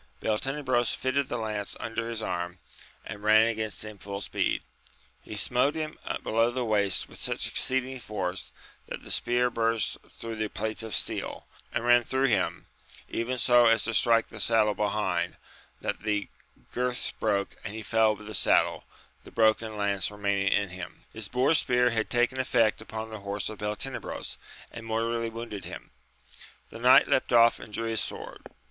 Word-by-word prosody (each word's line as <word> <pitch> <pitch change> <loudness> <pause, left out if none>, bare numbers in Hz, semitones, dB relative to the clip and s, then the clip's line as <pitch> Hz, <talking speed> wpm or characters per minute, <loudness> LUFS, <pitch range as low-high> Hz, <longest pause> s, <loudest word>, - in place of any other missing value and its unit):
Beltenebros 125 +1 0
fitted 130 +1 0
the 120 - -2
lance 105 -3 -3
under 115 0 -3
his 115 -2 -3
arm, 90 -2 -3 0.5
and 100 - -7
ran 110 +1 +6
against 110 -2 -2
him 105 -2 -9
full 100 0 -5
speed: 100 - -1 0.6
he 110 - -8
smote 125 +7 +2
him 155 -1 -4 0.2
below 115 +1 +2
the 125 0 -2
waist 100 -4 +2
with - - -13
such - - -2
exceeding 130 0 -1
force 95 -5 -4 0.4
that - - -7
the - - -7
spear 125 0 +1
burst 115 -1 0
through 115 -1 -7
the 110 0 -1
plates 110 +2 -3
of 110 -2 -2
steel, - - -1 0.3
and 115 - -2
ran 120 0 +6
through 130 +3 +1
him, 105 -8 +1 0.4
even 125 +3 -2
so 120 -1 +5
as 115 0 +4
to 115 - -1
strike 115 0 +4
the - - -8
saddle 110 -2 +4
behind, 95 -4 -1 0.5
that - - -3
the 105 -1 -1 0.4
girths 125 0 -1
broke, 100 -2 -1
and 105 -1 -6
he 110 - -6
fell 110 0 +3
with 105 - -12
the 110 - -7
saddle, 95 - +2 0.4
the - - -12
broken 110 -1 +2
lance 100 -1 +1
remaining 100 -1 0
in 100 -1 +2
him. 90 -2 -9
His 110 -2 -2
boar 130 +7 +2
spear 125 -5 +3
had 110 -1 -1
taken 120 +2 +1
effect 115 -4 +2
upon 110 0 -6
the 110 - -6
horse 100 0 -3
of 110 - -8
Beltenebros, 105 +6 -4 0.3
and 115 - -8
mortally 115 +1 -1
wounded 115 -3 -6
him. - - -8 0.8
The - - -9
knight - - +7
leapt - - +1
off 115 -1 +6
and - - -10
drew 115 +2 -3
his 110 -1 +1
sword. - - -5
110 Hz, 175 wpm, -28 LUFS, 105-120 Hz, 0.8 s, knight